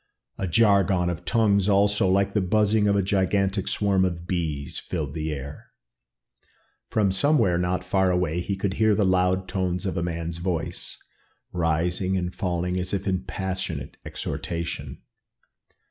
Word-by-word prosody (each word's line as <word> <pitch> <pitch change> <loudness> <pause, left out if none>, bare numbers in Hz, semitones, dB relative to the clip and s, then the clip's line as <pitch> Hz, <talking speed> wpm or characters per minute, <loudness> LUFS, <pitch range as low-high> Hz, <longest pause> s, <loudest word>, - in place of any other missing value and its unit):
A 95 - -1
jargon 95 -2 +3
of 90 +1 -7
tongues 105 -2 +3
also, 100 0 +3
like 95 +1 +2
the 105 - +2
buzzing 105 +2 +2
of 100 - +3
a 100 - +2
gigantic 95 0 +1
swarm 100 -2 +2
of 85 -2 -2
bees, 80 -6 -2
filled 75 -6 -4
the 80 0 -3
air. 70 0 -7 1.2
From 105 -3 +2
somewhere 100 - +2
not 90 +1 -1
far 95 -1 +2
away, 90 -2 0
he 100 +2 -2
could 95 0 -2
hear 110 0 +3
the 105 - +2
loud 95 0 +2
tones 90 0 -2
of 95 -4 -2
a - - 0
man's 85 -1 -3
voice, 85 -2 -3 0.5
rising 90 +3 0
and 90 0 -2
falling 90 0 -1
as 90 +2 -1
if 95 - -4
in 95 -2 -1
passionate 95 -7 -4
exhortation. 85 -1 -5
95 Hz, 150 wpm, -25 LUFS, 85-100 Hz, 1.2 s, jargon